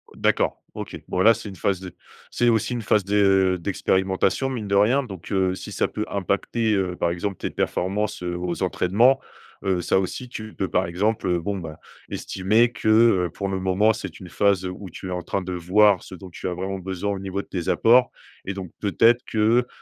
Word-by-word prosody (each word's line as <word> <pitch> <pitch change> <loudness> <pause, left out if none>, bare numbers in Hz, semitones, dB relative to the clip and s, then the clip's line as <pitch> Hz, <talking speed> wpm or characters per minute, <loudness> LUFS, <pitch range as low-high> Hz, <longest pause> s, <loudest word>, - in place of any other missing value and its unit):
D'accord - - +1 0.2
OK. - - -6
Bon - - -2
là 110 +5 +7
c'est 110 -2 -7
une 95 - -9
phase 95 +1 0
de 90 -2 -8 0.4
c'est 120 - +1
aussi 115 +1 +2
une 120 - -3
phase 105 0 +2
de 95 -2 +3
d'expérimentation 95 +6 0
mine 115 -6 -4
de 100 - +2
rien 115 +8 +4
donc, 95 -8 -9
heu, 95 -1 +2
si - - -8
ça - - +1
peut 105 - -3
impacter, 100 +3 0
heu, 95 -2 -1
par 85 -1 0
exemple 95 +3 -3
tes - - -3
performances, 100 +1 -2
heu, 90 0 -3
aux 90 +1 -3
entraînements, 110 +9 +3 0.5
heu, 95 -2 +1
ça 95 - +2
aussi 120 +6 -4
tu 110 -2 -8
peux 95 - -3
par 95 - +1
exemple, 105 +5 -1
heu, 90 -1 +1
bon 100 +3 -2
ben 80 -4 -7 0.3
estimer 110 +6 +1
que, 110 -1 -5
heu, 110 -5 +5
pour 100 -1 -3
le 95 - -2
moment, 95 +4 +3
c'est 95 -5 -6
une 90 - -9
phase 100 0 +2
où 90 +1 -6
tu 95 +2 -8
es - - -4
en 90 - -2
train 100 - -2
de 90 0 -6
voir 95 +3 +3
ce - - -10
dont 95 +1 -11
tu 90 - -6
as 90 - -2
vraiment 95 +2 -4
besoin 95 +2 -3
au 100 - -3
niveau 95 0 -3
de - - -18
tes 90 -3 -4
apports, 125 +2 +5 0.4
et 95 - -3
donc 95 -3 -7
peut-être 115 +4 +3
que, 115 +3 +2
95 Hz, 220 wpm, -23 LUFS, 90-110 Hz, 0.5 s, là